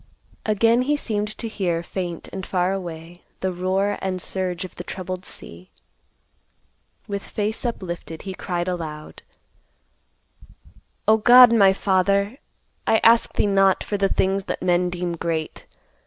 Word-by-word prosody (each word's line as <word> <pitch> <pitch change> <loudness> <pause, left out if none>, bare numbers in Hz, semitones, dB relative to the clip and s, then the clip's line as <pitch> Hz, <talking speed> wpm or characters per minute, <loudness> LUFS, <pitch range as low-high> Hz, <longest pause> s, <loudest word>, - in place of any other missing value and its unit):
Again 225 +3 +3
he 290 +4 +1
seemed 210 -5 -3
to 230 - -4
hear, 175 -6 -2
faint 175 -2 -5
and 190 - -5
far 185 0 0
away, 175 -2 -7 0.2
the 190 - 0
roar 190 +3 0
and 185 -1 -2
surge 185 -1 -3
of 185 - -11
the 175 - -8
troubled 185 0 -6
sea. 85 +2 -13 1.4
With 200 -1 -3
face 215 +2 -3
uplifted, 175 -8 -5
he 190 - -5
cried 175 -1 -3
aloud, 155 -4 -5 1.9
"O 220 - +6
God, 245 +2 +8
my 200 -4 +6
Father, 200 +4 +1 0.5
I 220 - +5
ask 230 0 +5
thee - - +1
not 195 -1 +3
for 205 - -2
the 195 -1 +2
things 190 +1 0
that - - -4
men 180 0 +2
deem 175 0 -3
great. 165 -2 -4
190 Hz, 140 wpm, -23 LUFS, 175-205 Hz, 1.9 s, God